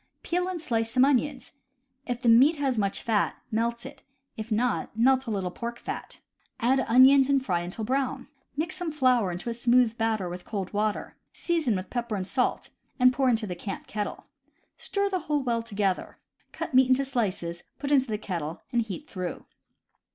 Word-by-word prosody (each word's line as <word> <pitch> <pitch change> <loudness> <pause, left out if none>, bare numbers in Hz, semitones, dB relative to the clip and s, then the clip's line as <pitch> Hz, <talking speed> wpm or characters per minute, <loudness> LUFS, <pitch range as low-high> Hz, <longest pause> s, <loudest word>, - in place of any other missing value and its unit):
— - - -48
Peel 360 +1 0
and 370 -2 -3
slice 225 -7 -1
some 255 +3 +4
onions. 280 0 0 0.6
If 245 -1 -3
the - - +1
meat 255 +8 +7
has 270 -5 0
much 200 -1 -1
fat, 220 -3 +1 0.2
melt 235 +2 -1
it; 275 +1 -10 0.3
if 225 -1 -7
not, 225 0 0
melt 260 +2 +3
a - - -2
little 190 -4 -2
pork 235 +4 -5
fat. - - -7 0.4
x\dd 260 +3 +2
onions, 265 +3 +7
and 275 -2 +2
fry 175 -6 +1
until 180 +6 -5
brown. 265 +1 -1 0.3
Mix 315 +3 -1
some 355 -3 -3
flour 255 -9 +2
into 175 +6 -6
a 235 - -1
smooth 240 0 +3
batter 220 -4 0
with 180 +1 -6
cold 195 -4 -5
water, 210 0 -2 0.2
season 320 - 0
with 185 +1 -5
pepper 235 -3 -2
and 185 -2 -3
salt, 255 +2 -1 0.3
and 255 0 +6
pour 260 0 +2
into 225 -2 +1
the 185 - -4
camp 195 +3 -6
kettle. 210 -1 -4 0.5
Stir 400 0 -1
the 380 -2 -1
whole 295 -4 -1
well 235 -2 0
together. 205 -4 -2 0.3
Cut - - -5
meat 260 0 +6
into 265 +1 +3
slices, 185 -10 -2 0.2
put 280 0 -4
into 265 -2 +4
the 215 -2 -2
kettle, 170 -6 -5
and 240 - +2
heat 225 +6 -6
through. 185 - -5
235 Hz, 190 wpm, -27 LUFS, 210-265 Hz, 0.6 s, meat